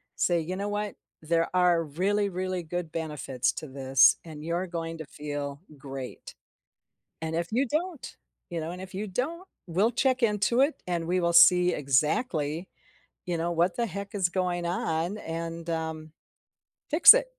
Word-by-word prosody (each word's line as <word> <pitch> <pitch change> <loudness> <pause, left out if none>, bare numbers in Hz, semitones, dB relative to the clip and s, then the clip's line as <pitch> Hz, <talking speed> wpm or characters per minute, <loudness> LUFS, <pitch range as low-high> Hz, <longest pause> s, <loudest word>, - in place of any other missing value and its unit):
say, 175 -1 +2
"You 180 +4 -4
know 205 +1 -2
what? 205 0 -3 0.3
There 165 +1 +1
are 175 -2 +4
really, 200 +7 0
really 185 -1 -3
good 165 0 -4
benefits 140 -6 -2
to 155 - -7
this, 135 -1 +5
and 155 -2 -9
you're 170 +3 -2
going 165 -1 -4
to 160 - -7
feel 145 -1 -5 0.2
great. 135 -2 -8 0.9
And 160 0 -3
if 170 0 -2
you 255 +3 +1
don't 325 +2 -3 0.4
you 170 - -2
know, 160 +2 -4
and 180 +1 -7
if 185 0 -9
you 210 +2 -3
don't, 320 - -3 0.2
we'll 195 +8 +2
check 255 +1 +1
into 220 +3 +2
it, 290 +3 +1
and 170 -2 -1
we 180 +1 +1
will 170 -1 +1
see 180 +1 +7
exactly, 150 - 0 0.6
you 175 -1 -1
know, 170 +1 -1
what 170 +2 +1
the 235 -1 0
heck 200 +2 -7
is 190 -4 +2
going 175 -1 -1
on 170 +3 -1
and, 165 0 -5
um, 160 -1 -4 0.8
fix 315 +9 +10
it." - - +2
170 Hz, 170 wpm, -28 LUFS, 160-200 Hz, 0.9 s, fix